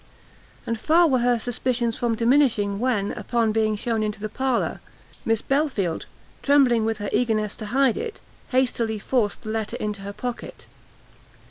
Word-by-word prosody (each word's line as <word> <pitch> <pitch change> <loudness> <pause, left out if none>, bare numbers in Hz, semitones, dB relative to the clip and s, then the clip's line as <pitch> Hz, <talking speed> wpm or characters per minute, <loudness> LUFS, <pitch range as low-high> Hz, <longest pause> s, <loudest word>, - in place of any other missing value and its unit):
And 230 -1 -2
far 330 +7 +4
were 260 -4 +2
her 245 0 +2
suspicions 240 0 -1
from 235 -2 0
diminishing, 230 -5 +2
when, 230 -5 0
upon 230 -2 0
being 215 0 +1
shown 225 +1 -1
into 210 -1 -2
the 215 +1 -4
parlour, 260 +2 -1 0.4
Miss 225 -1 +1
Belfield, 270 - 0 0.3
trembling 260 -6 +4
with 225 -1 -1
her 205 -1 -4
eagerness 215 -2 +1
to 215 - -6
hide 260 +1 +2
it, 455 -2 -5 0.3
hastily 240 -4 +1
forced 215 0 -1
the 215 - -6
letter 220 -1 -2
into 210 -2 -3
her 200 +1 -6
pocket. 245 +2 -6
230 Hz, 155 wpm, -24 LUFS, 215-255 Hz, 0.4 s, far